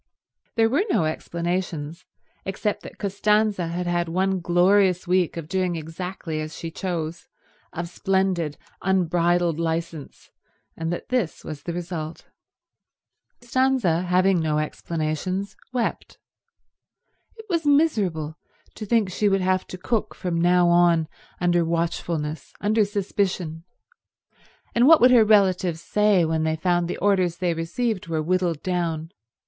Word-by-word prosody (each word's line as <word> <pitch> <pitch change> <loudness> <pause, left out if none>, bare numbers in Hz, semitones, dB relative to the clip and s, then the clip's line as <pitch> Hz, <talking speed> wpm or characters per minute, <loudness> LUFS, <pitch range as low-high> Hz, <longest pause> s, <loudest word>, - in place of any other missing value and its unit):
There 225 -1 +4
were 275 - +2
no 170 - +2
explanations, 170 -1 -3 0.4
except 200 +2 -2
that - - -11
Costanza 205 -1 +1
had 175 +2 -3
had 175 -1 0
one 190 +2 0
glorious 180 +2 +3
week 180 -2 +1
of 165 -2 -5
doing 185 -1 0
exactly 165 0 -5
as 155 +1 -6
she 165 - -6
chose, 170 -2 -4 0.4
of 170 +1 -4
splendid 180 -4 0 0.2
unbridled 175 -2 +1
licence, 165 -2 -4 0.4
and 165 +1 -3
that 175 - -5
this 245 -10 -1
was 150 -2 -6
the 170 - -5
result. 165 -2 -5 1.2
Costanza, 245 -8 +1
having 185 +1 +3
no 155 -2 0
explanations, 160 +5 -3 0.2
wept. 245 -2 -3 1.2
It 445 -1 -12
was 335 -6 -1
miserable 195 - +1 0.4
to 215 - -6
think 225 -2 +3
she 205 +3 +1
would 195 -1 +2
have 185 0 +1
to 185 - -7
cook 220 +4 -2
from 170 -3 -2
now 175 0 +4
on 170 -2 +4 0.3
under 175 -1 +2
watchfulness, 165 -2 -2
under 215 +1 +2
suspicion; 185 -5 -2 1.1
and 240 +2 +4
what 325 0 +8
would 250 +1 +6
her 240 -3 +7
relations 190 -5 +3
say 205 0 +2
when 160 0 0
they 160 0 0
found 175 +1 +1
the - - -4
orders 185 -4 +2
they 180 -2 0
received 185 +5 -2
were 160 -2 -1
whittled 175 -2 0
down? 170 -3 -2
175 Hz, 135 wpm, -24 LUFS, 165-195 Hz, 1.2 s, what